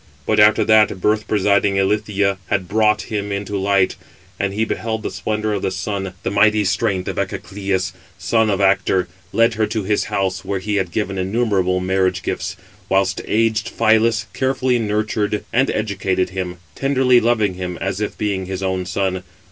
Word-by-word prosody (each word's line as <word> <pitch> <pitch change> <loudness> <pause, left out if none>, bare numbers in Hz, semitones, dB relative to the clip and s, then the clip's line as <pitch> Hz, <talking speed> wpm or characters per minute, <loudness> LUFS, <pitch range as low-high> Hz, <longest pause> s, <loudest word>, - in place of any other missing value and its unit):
But 110 - +2
after 105 +1 +5
that 110 -3 +4
birth 105 +3 +1
presiding 100 -1 +2
Ilithyia 100 0 +1
had 95 -2 -1
brought 105 +1 +2
him 105 -2 -4
into 100 +1 -3
light, 100 -1 +1 0.4
and 100 0 0
he 110 +3 0
beheld 110 0 -3
the - - -3
splendour 110 0 -2
of 100 - -2
the - - 0
sun, 95 0 -4
the - - -1
mighty 105 +1 +3
strength 95 -1 0
of - - -4
Echecleus, 95 -3 -2 0.2
son 110 -1 +1
of 100 -1 0
Actor, 95 -2 +2 0.2
led 115 +1 +3
her 110 -1 0
to 110 -1 -2
his 105 +2 0
house 95 -2 -2
when 95 -2 -3
he 105 +1 -1
had 95 -3 0
given 95 -2 -2
innumerable 95 -2 +1
marriage 95 0 0
gifts; - - -3 0.3
whilst 95 0 +1
aged 110 0 +1
Phylas 110 0 +2
carefully 130 -2 +1
nurtured 105 -1 -1
and 130 +3 +3
educated 95 -3 -1
him, 90 -1 -4 0.2
tenderly 130 - +3
loving 110 -4 +1
him, 90 -1 -5
as 100 - -3
if 105 - -3
being 100 -3 -2
his 95 0 -4
own 95 -1 -1
son. 95 -1 -1
100 Hz, 170 wpm, -20 LUFS, 95-110 Hz, 0.4 s, after